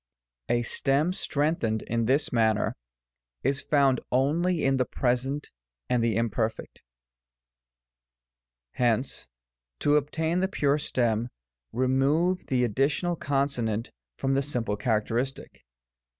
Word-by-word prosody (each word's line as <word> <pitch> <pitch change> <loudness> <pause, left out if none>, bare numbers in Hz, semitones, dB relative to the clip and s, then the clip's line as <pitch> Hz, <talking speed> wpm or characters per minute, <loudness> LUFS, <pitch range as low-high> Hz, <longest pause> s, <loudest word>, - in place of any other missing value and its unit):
A 120 0 +2
stem 140 +8 +1
strengthened 145 -10 0
in 115 0 -1
this 135 +4 +1
manner 110 -3 +2 0.7
is 135 +2 +1
found 140 -3 +3
only 160 +6 +1
in 135 0 +3
the 125 - +2
Present 130 +4 -1 0.4
and 125 -2 +2
the 115 -3 +1
Imperfect. 115 -1 -2 1.9
Hence, 120 - 0 0.5
to 145 - +3
obtain 160 +4 0
the 190 - +2
pure 145 -6 +1
stem, 120 -4 0 0.4
remove 135 +9 +1
the 125 -2 +1
additional 140 - +1
consonant 135 -7 -1 0.3
from 135 - 0
the 135 - +2
simple 120 -7 -1
characteristic. 115 - -2
130 Hz, 105 wpm, -27 LUFS, 115-145 Hz, 1.9 s, found